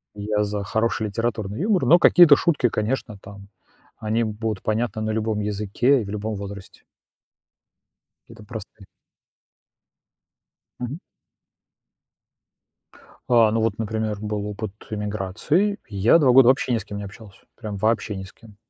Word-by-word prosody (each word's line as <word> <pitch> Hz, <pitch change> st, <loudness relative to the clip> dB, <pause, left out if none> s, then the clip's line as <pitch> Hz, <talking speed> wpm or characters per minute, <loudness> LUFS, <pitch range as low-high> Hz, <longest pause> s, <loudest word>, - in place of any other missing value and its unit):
Я 105 Hz, +1 st, -1 dB
за 105 Hz, -1 st, -3 dB
хороший 110 Hz, +2 st, -1 dB
литературный 110 Hz, 0 st, -3 dB
юмор, 200 Hz, 0 st, +1 dB
но 170 Hz, -, +7 dB
какие-то 170 Hz, -4 st, +7 dB
шутки, 145 Hz, -7 st, +1 dB
конечно, 110 Hz, 0 st, -3 dB
там 100 Hz, 0 st, -12 dB, 0.5 s
они 110 Hz, +2 st, 0 dB
будут 110 Hz, -1 st, -4 dB
понятны 110 Hz, 0 st, -1 dB
на 110 Hz, -, -2 dB
любом 110 Hz, -1 st, -1 dB
языке 105 Hz, +6 st, +1 dB
и -, -, -6 dB
в 100 Hz, -, -8 dB
любом 105 Hz, +1 st, -4 dB
возрасте. 100 Hz, -1 st, -9 dB, 1.5 s
Это 110 Hz, -2 st, -14 dB
простая 105 Hz, -2 st, -10 dB, 1.9 s
Мгм. 130 Hz, +7 st, -5 dB, 2.3 s
А, 115 Hz, -3 st, +5 dB
ну 115 Hz, +1 st, 0 dB
вот, 110 Hz, -2 st, -1 dB
например, 110 Hz, -1 st, -2 dB
был 105 Hz, -1 st, -3 dB
опыт 105 Hz, 0 st, -5 dB, 0.2 s
эмиграции- 105 Hz, -, -1 dB
я 105 Hz, -, +4 dB
2 135 Hz, -5 st, +4 dB
года 130 Hz, -1 st, +7 dB
вообще 130 Hz, -1 st, +2 dB
ни 115 Hz, -, +2 dB
с 105 Hz, -, -8 dB
кем 105 Hz, -1 st, -7 dB
не 100 Hz, -, -6 dB
общался, 100 Hz, -1 st, -13 dB, 0.2 s
прям 105 Hz, -3 st, -6 dB
вообще 110 Hz, 0 st, 0 dB
ни 95 Hz, -, -6 dB
с 95 Hz, -, -13 dB
кем. 110 Hz, -3 st, -18 dB
110 Hz, 140 wpm, -23 LUFS, 105-115 Hz, 2.3 s, но